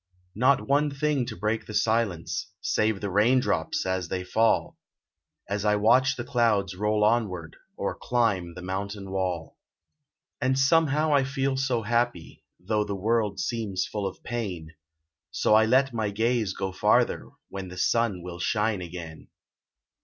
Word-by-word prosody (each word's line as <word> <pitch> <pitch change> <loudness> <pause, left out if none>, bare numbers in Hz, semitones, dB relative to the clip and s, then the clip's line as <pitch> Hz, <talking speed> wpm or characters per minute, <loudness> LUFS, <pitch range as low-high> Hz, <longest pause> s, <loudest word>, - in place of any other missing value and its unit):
Not 130 +6 +2
one 145 +2 +3
thing 140 -2 -1
to - - -5
break 110 +4 -2
the 105 - -6
silence, 110 -7 0
Save 110 -2 0
the 100 -2 -3
rain 110 +7 +4
drops - - -1
as 95 -2 -1
they 90 +2 -3
fall, 110 +5 +1 0.7
As 100 0 -2
I 105 -1 +3
watch 125 +5 +4
the 120 - -5
clouds 115 -7 +1
roll 105 +2 +1
onward, 100 -8 0 0.2
Or - - -2
climb 100 -9 0
the 90 - -8
mountain 100 +1 -4
wall. 90 -4 -3 0.8
And 130 +1 +1
somehow 150 +1 +3
I 140 -2 +4
feel 135 0 -1
so 130 -4 0
happy, 115 -6 -1 0.2
Though 105 +4 0
the 100 -1 -4
world 105 0 0
seems 110 -6 -2
full 105 -2 -3
of 95 - -9
pain, 95 -10 -4 0.6
So - - +1
I 110 +1 +6
let 130 +2 +3
my 110 -3 -1
gaze 110 -1 0
go 95 -1 -3
farther, 95 - +2 0.2
When 95 -1 -6
the 90 0 -10
sun 105 -3 +1
will 90 -1 -7
shine 105 +1 0
again. 85 -2 -8
105 Hz, 155 wpm, -26 LUFS, 95-120 Hz, 0.8 s, I